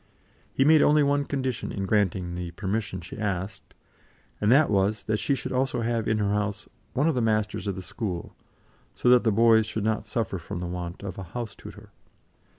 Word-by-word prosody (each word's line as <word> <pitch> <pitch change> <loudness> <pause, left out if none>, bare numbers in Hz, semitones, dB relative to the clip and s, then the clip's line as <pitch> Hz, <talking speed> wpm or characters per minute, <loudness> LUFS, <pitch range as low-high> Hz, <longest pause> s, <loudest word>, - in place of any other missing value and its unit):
He 135 - +2
made 155 0 +6
only 150 0 +5
one 140 0 +2
condition 130 -4 -3
in 95 - -3
granting 95 -4 +1
the 90 0 -4
permission 95 +1 -3
she 85 - -9
asked, 100 -1 -4 0.7
and 105 +2 +3
that 145 +1 +5
was, 100 +1 +1
that 110 0 -1
she 140 - +1
should 130 - -5
also 130 -1 0
have 115 -1 -1
in 110 - +2
her 100 -1 +1
house 105 -1 -2 0.3
one 140 +5 +2
of 165 - +3
the 125 - 0
masters 110 -2 0
of 100 - -1
the 95 - -7
school, 90 -3 -5 0.6
so 125 - +1
that 125 -1 +6
the 115 - +3
boys 110 0 +5
should 110 -1 -3
not 110 0 -1
suffer 105 -5 -2
from 85 +2 -6
the 90 - -4
want 90 +1 -5
of 95 -1 -6
a - - -5
house 115 -4 -4
tutor. - - -12
105 Hz, 205 wpm, -26 LUFS, 95-120 Hz, 0.7 s, made